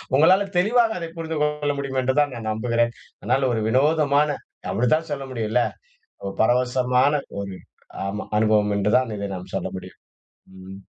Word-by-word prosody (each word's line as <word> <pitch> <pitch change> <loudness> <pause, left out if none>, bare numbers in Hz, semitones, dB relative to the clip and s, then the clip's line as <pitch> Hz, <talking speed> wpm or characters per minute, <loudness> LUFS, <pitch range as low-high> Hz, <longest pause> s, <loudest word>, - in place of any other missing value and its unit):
உங்களால 185 +7 +5
தெளிவாக 225 +4 +3
அதை 170 -1 -5
புரிந்து 160 -1 -3
கொள்ள 150 -1 0
முடியும் 135 -1 -2
என்றுதான் 135 +2 +1
நான் 115 -2 -4
நம்புகிறேன். 115 +1 0 0.3
அதனால 130 +1 +1
ஒரு 110 - 0
வினோதமான 145 +3 +3 0.4
அப்டித்தான் 155 +8 +1
சொல்ல 140 -1 -3
முடியும் 115 -4 -3
இல்ல? 120 +1 +3 0.6
ஒரு 100 0 -4
பரவசமான 125 +3 +2 0.3
ஒரு 100 -1 -6 0.5
ஆமா. 105 +2 -3
அனுபவம் 105 -1 +3
என்று 100 +1 +1
தான் 125 -4 -1
இதை 100 0 -3
நாம் 90 - -9
சொல்ல - - -2
முடியும். - - -9 0.6
ம். 95 +1 -10
130 Hz, 155 wpm, -23 LUFS, 110-150 Hz, 0.6 s, உங்களால